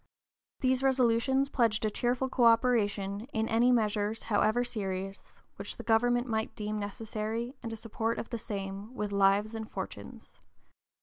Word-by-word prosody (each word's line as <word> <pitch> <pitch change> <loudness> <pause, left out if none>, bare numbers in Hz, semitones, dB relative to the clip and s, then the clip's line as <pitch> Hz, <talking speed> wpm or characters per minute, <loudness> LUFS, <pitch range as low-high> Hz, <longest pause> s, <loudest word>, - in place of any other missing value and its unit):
These 260 0 +2
resolutions 265 +1 +3
pledged 225 -5 +1
a 215 - +1
cheerful 245 +4 0
coöperation 230 -4 +2
"in 220 0 0
any 235 +3 +4
measures, 215 -2 +1
however 220 +2 +2
serious," 195 -4 -5
which - - -6
the - - -7
government 240 +2 +3
might 220 -3 -2
deem 210 0 -3
necessary 220 +3 -4
and 230 - -5
a - - -4
support 225 +1 -2
of - - -5
the 235 - -3
same 200 +3 -6
with 210 -4 -3
"lives 200 +2 +3
and 220 -1 -5
fortunes." - - -8
225 Hz, 145 wpm, -30 LUFS, 210-245 Hz, -, any